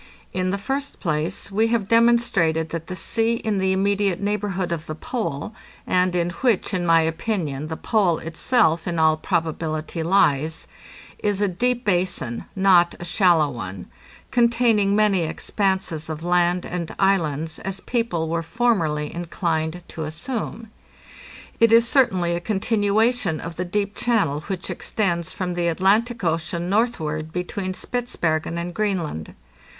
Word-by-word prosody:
In 185 Hz, 0 st, 0 dB
the 200 Hz, -, 0 dB
first 275 Hz, +7 st, -4 dB
place, 165 Hz, +4 st, -1 dB
we 220 Hz, +3 st, +2 dB
have 225 Hz, -4 st, 0 dB
demonstrated 230 Hz, -9 st, +3 dB
that 165 Hz, +1 st, -5 dB
the 185 Hz, -, -5 dB
sea 225 Hz, +5 st, +1 dB
in 215 Hz, -3 st, -1 dB
the 190 Hz, 0 st, +1 dB
immediate 200 Hz, -1 st, +1 dB
neighborhood 200 Hz, -3 st, -2 dB
of 165 Hz, -2 st, -3 dB
the 155 Hz, -, -4 dB
Pole, 220 Hz, -, -4 dB, 0.3 s
and 180 Hz, 0 st, +2 dB
in 175 Hz, 0 st, +1 dB
which, 220 Hz, +3 st, 0 dB
in 175 Hz, -2 st, -1 dB
my 165 Hz, 0 st, +6 dB
opinion, 160 Hz, -3 st, -2 dB
the 160 Hz, 0 st, -5 dB
Pole 195 Hz, -7 st, +2 dB
itself 165 Hz, -1 st, +1 dB
in 170 Hz, -1 st, -2 dB
all 160 Hz, -1 st, +4 dB
probability 160 Hz, 0 st, -2 dB
lies, 160 Hz, -4 st, +2 dB, 0.5 s
is 205 Hz, -2 st, 0 dB
a 205 Hz, -, +2 dB
deep 245 Hz, +7 st, -1 dB
basin, 175 Hz, -, 0 dB
not 185 Hz, -3 st, +4 dB
a 175 Hz, -, -6 dB
shallow 175 Hz, -4 st, +3 dB
one, 95 Hz, -6 st, -7 dB, 0.5 s
containing 230 Hz, -4 st, +3 dB
many 210 Hz, -3 st, +3 dB
expanses 170 Hz, -1 st, -1 dB
of 155 Hz, 0 st, -5 dB
land 175 Hz, 0 st, +2 dB
and 170 Hz, -2 st, -4 dB
islands, 160 Hz, -5 st, +1 dB
as 195 Hz, 0 st, -4 dB
people 230 Hz, -10 st, -1 dB
were 165 Hz, +1 st, -1 dB
formerly 165 Hz, -7 st, 0 dB
inclined 170 Hz, -1 st, -2 dB
to 160 Hz, -, -5 dB
assume. 225 Hz, -, -5 dB, 0.9 s
It 230 Hz, -1 st, +5 dB
is 230 Hz, +1 st, +6 dB
certainly 190 Hz, -11 st, +3 dB
a 170 Hz, -, -1 dB
con 200 Hz, +2 st, -1 dB
tinuation 210 Hz, -3 st, +1 dB
of 165 Hz, 0 st, -7 dB
the 180 Hz, -, -3 dB
deep 200 Hz, +3 st, -2 dB
channel 210 Hz, -12 st, +1 dB
which 190 Hz, -3 st, -4 dB
extends 170 Hz, -6 st, -1 dB
from 180 Hz, -2 st, -3 dB
the 175 Hz, -1 st, 0 dB
Atlantic 205 Hz, +7 st, +2 dB
Ocean 170 Hz, +1 st, -1 dB
northward 160 Hz, -9 st, 0 dB
between 185 Hz, +2 st, -3 dB
Spitzbergen 170 Hz, -11 st, -2 dB
and 175 Hz, +1 st, -4 dB
Greenland. 175 Hz, -, -2 dB
180 Hz, 145 wpm, -23 LUFS, 165-210 Hz, 0.9 s, my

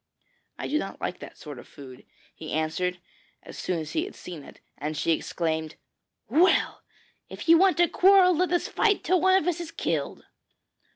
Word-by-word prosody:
'I -, -, -5 dB
do 300 Hz, -, +1 dB
not 195 Hz, -, -6 dB
like 180 Hz, -, -4 dB
that -, -, -11 dB
sort 145 Hz, -5 st, -9 dB
of -, -, -13 dB
food,' 130 Hz, -3 st, -13 dB, 0.3 s
he 155 Hz, -, -9 dB
answered 160 Hz, +4 st, -1 dB, 0.5 s
as -, -, -11 dB
soon 180 Hz, -, -2 dB
as 155 Hz, -2 st, -5 dB
he 320 Hz, -, 0 dB
had 405 Hz, -, -10 dB
seen 175 Hz, -4 st, -9 dB
it; -, -, -15 dB, 0.2 s
and 150 Hz, +1 st, -4 dB
she -, -, 0 dB
exclaimed, 160 Hz, -1 st, -2 dB, 0.5 s
'Well! 325 Hz, -, +2 dB, 0.5 s
if -, -, -9 dB
you 330 Hz, 0 st, +7 dB
want 380 Hz, -1 st, +4 dB
to 345 Hz, 0 st, +4 dB
quarrel 370 Hz, 0 st, +5 dB
let 360 Hz, +3 st, 0 dB
us 350 Hz, -, +1 dB
fight 415 Hz, -2 st, +1 dB
till 365 Hz, -1 st, +2 dB
one 375 Hz, +1 st, +4 dB
of 350 Hz, -, -5 dB
us 350 Hz, -1 st, 0 dB
is 335 Hz, -, -7 dB
killed.' -, -, -3 dB
280 Hz, 190 wpm, -26 LUFS, -, 0.5 s, you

